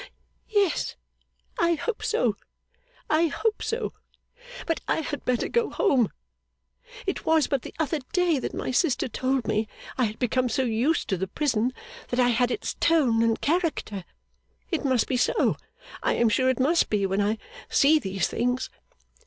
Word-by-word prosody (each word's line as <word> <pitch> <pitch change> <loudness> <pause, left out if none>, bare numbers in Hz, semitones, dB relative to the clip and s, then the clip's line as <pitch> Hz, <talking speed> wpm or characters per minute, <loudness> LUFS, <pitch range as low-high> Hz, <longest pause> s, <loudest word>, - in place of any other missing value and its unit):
'Yes, 405 -5 +1 0.6
I 340 0 +3
hope 450 +7 -3
so, 450 +1 +1 0.7
I 320 +2 +3
hope 430 +8 -1
so. 465 +2 -2 0.7
But 330 - -1
I - - +1
had 290 -1 -5
better 250 -1 +1
go 470 -1 +1
home! 255 - +2 0.9
It 380 - -2
was 320 -2 +3
but 275 -3 0
the - - -10
other 315 0 0
day 355 -5 +2
that - - -4
my - - -2
sister 270 0 +1
told 255 +1 -1
me 215 +1 0 0.3
I 250 - +4
had 215 0 -4
become 250 0 +1
so 260 +3 +1
used 245 +7 +1
to 190 - +1
the 190 +2 -2
prison 250 -2 0 0.4
that 245 - -2
I 245 -1 +5
had 245 +1 +2
its 415 - -2
tone 270 -9 +3
and 230 -1 +2
character. 300 - -1 0.7
It 330 - 0
must 260 -4 +2
be 255 - 0
so. - - +2 0.5
I - - +1
am 235 -1 +3
sure 260 +4 +2
it 260 - 0
must 315 +6 +3
be 205 -2 +1
when 195 +1 0
I 210 +2 +1 0.3
see 305 +3 +5
these 190 -5 -1
things. 250 +2 -1
260 Hz, 170 wpm, -26 LUFS, 230-325 Hz, 0.9 s, I